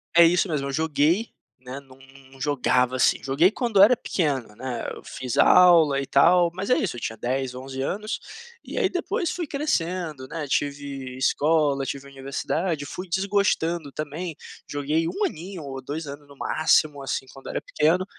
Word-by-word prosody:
É 170 0 +9
isso 175 +4 +3
mesmo, 140 -3 -1
eu - - -3
joguei, 160 +7 +1 0.3
né, 130 +2 -8
não 135 -2 -18
não 135 0 -18
não - - -15
jogava, 130 -2 +1
assim, 125 - +2
joguei 140 +7 +4
quando 220 -3 +1
era 230 +5 +7
pequeno, 135 - -2
né, 125 +1 -5
eu - - -10
fiz 125 -2 -5
aula 165 -6 +6
e 140 - -3
tal 170 +6 +4
mas 190 +2 -5
é 250 - +4
isso, 180 - -1
eu - - -6
tinha 115 -1 -4
10, 130 +2 -2
11 130 +1 -6
anos. 210 +9 -3 0.4
E - - -8
aí 410 -6 +2
depois 355 -2 -2
fui 345 -3 -4
crescendo, 175 - -2
né, 155 +1 -5
tive 140 -2 -3
escola, 145 0 +2
tive 140 0 -5
universidade, 145 +4 -3
fui 180 +6 -7
desgostando 175 -5 0
também, 155 +3 -5 0.3
joguei 150 +3 0
1 410 - -1
aninho 180 - -6
ou 135 -1 -6
2 150 +5 -5
anos 145 0 -9
no 140 -1 -16
máximo, 155 -2 +2
assim, 135 0 -3
quando 135 - -10
era - - -2
pequeno, 170 +5 +1
150 Hz, 180 wpm, -24 LUFS, 135-175 Hz, 0.4 s, É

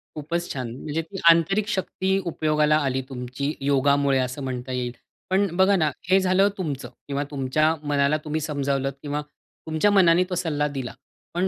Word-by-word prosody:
खूपच 170 +3 -3
छान. 125 -4 -4
म्हणजे 155 +2 -2
ती 165 +4 -10
आंतरिक 195 +6 +3
शक्ती 190 -1 -1
उपयोगाला 155 -2 +2
आली 130 0 0
तुमची 130 +3 -4
योगामुळे 140 0 +3
असं 130 +2 -3
म्हणता 130 -1 -4
येईल. 125 -1 -2 0.4
पण 195 +2 +3
बघा 190 +1 +5
ना 160 -5 +2 0.2
हे 190 - +6
झालं 190 +2 +3
तुमचं 150 -8 -4 0.2
किंवा 140 0 -1
तुमच्या 145 +3 +1 0.2
मनाला 140 +1 +2
तुम्ही 155 +1 -2
समजावलत 140 -2 -1
किंवा 145 0 -3 0.5
तुमच्या 160 +6 +2
मनाने 180 -3 +5
तो 180 - -2
सल्ला 150 -4 0
दिला, 135 -4 -5 0.4
पण 180 +2 +1
150 Hz, 160 wpm, -24 LUFS, 140-175 Hz, 0.5 s, हे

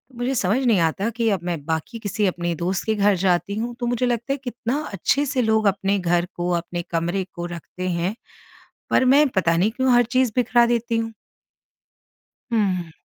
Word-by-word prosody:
मुझे 245 +3 -1
समझ 205 0 +1
नहीं 225 -6 +4
आता 170 +7 +1
कि 230 -1 +1
अब 200 -3 +1
मैं 175 -1 -2
बाकी 160 +8 -3
किसी 210 -1 -1
अपने 175 -1 -1
दोस्त 180 +3 -2
के 220 - +1
घर 205 -1 +3
जाती 190 +2 +1
हूँ 235 +2 -3
तो 245 - -2
मुझे 245 +1 0
लगता 240 +3 -1
है, - - -3
कितना 245 +2 -3
अच्छे 275 +10 +1
से 270 -2 0
लोग 220 -2 +2
अपने 195 0 +1
घर 175 -1 +1
को, 175 0 -2
अपने 175 0 -2
कमरे 175 +3 0
को 175 - -5
रखते 185 +2 -6
हैं। 175 +4 -1 0.8
पर - - +4
मैं 280 +4 +5
पता 170 -7 +1
नहीं 195 +6 +2
क्यों 260 +2 +1
हर 240 0 +5
चीज़ 255 -3 +3
बिखरा 240 -1 +4
देती 235 -1 0
हूँ। 225 0 -3 1.4
हुँ। 185 -6 0
205 Hz, 195 wpm, -22 LUFS, 175-240 Hz, 1.4 s, मैं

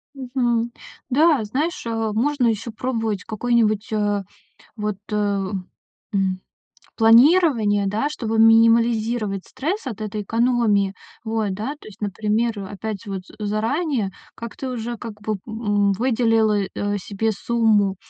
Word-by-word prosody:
Мгм. 245 -3 -1 0.4
Да, 295 -2 +4
знаешь, 295 - -2
э, 225 -1 -1
можно 255 +2 +1
ещё 225 +1 -1
пробовать 225 -4 -2
какое-нибудь, 220 -2 0
а, 205 -1 0 0.5
вот, 210 -2 -2 0.2
э, - - 0 1.0
м, 190 -2 0 0.6
планирование, 230 - +5
да, 220 +9 0
чтобы 225 -6 -3
минимализировать 225 -2 +4
стресс 300 +5 -3
от 220 -3 -6
этой 215 0 -3
экономии. 225 -3 +2 0.3
Вот, 220 -2 -1
да, 220 +9 -3
то - - -14
есть, 210 - -13
например, 210 +2 0
опять 205 0 -5
же 200 - -7
вот 190 -1 -3 0.2
заранее 220 - -1 0.2
как-то 235 +3 -6
уже, 240 -1 -4
как 215 -3 -8
бы, 215 -1 -2
м, 205 -3 +1
выделила, 225 -2 +2 0.2
э, 205 0 -1
себе 210 +3 -2
сумму, 210 -3 +2
225 Hz, 125 wpm, -22 LUFS, 210-240 Hz, 1.0 s, планирование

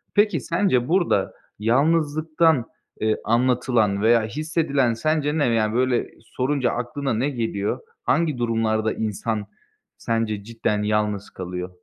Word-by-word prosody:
Peki, 210 +1 +3
sence, 130 -11 +1
burada 175 +1 +1 0.3
yalnızlıktan, 155 +3 +2 0.4
eee, 110 0 +2
anlatılan 120 -3 +2
veya 115 +1 +4
hissedilen 140 -1 0
sence 155 +4 0
ne? 145 - +2
Yani, 110 -2 +1
böyle 125 0 +1
sorunca 130 +2 -1
aklına 125 +3 -2
ne 125 +6 0
geliyor? 115 -6 -2 0.2
Hangi 155 -5 +1
durumlarda 110 -2 0
insan 110 0 -2 0.5
sence 110 -3 -2
cidden 105 -2 -2
yalnız 105 -1 -1
kalıyor? 90 0 -6
120 Hz, 115 wpm, -23 LUFS, 110-145 Hz, 0.5 s, veya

